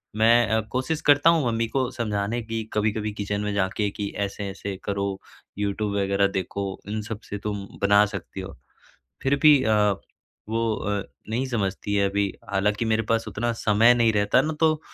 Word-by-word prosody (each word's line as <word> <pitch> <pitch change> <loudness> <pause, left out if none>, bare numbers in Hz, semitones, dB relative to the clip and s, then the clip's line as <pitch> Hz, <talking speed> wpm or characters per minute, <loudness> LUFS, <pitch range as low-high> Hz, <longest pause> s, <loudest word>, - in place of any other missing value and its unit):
मैं 115 +1 +5
अ, 110 0 +2
कोशिश 130 +5 -1
करता 145 +2 +5
हूँ 160 -5 +3
मम्मी 115 0 0
को 130 +1 -1
समझाने 110 0 -2
की 115 0 -3
कभी-कभी 105 0 0
किचन 100 0 -3
में 105 -1 -2
जाके 100 +1 0
कि 100 0 -4 0.2
ऐसे-ऐसे 100 0 -5
करो। 100 -1 -2 0.4
यूट्यूब 100 0 -1
वगैरह 100 0 +2
देखो 100 +2 -4 0.2
इन 110 0 -2
सब 110 0 -6
से 100 - -3
तुम 100 -2 -3 0.2
बना 100 +1 +5
सकती 100 -1 -7
हो 95 -6 -9 0.7
फिर 140 +1 +2
भी 150 -4 +7
अ, 110 0 +3 0.7
वो 115 0 0
अ, 100 -1 -2 0.3
नहीं 125 +4 -1
समझती 100 -4 -2
है 100 -1 +3
अभी 100 0 0 0.2
हालाँकि 105 +3 +1
मेरे 110 0 +1
पास 115 0 +2
उतना 120 +2 -1
समय 115 +2 +4
नहीं 115 -2 +3
रहता 105 +5 +3
न 155 +1 -2
तो 155 -1 +3
105 Hz, 175 wpm, -25 LUFS, 100-115 Hz, 0.7 s, भी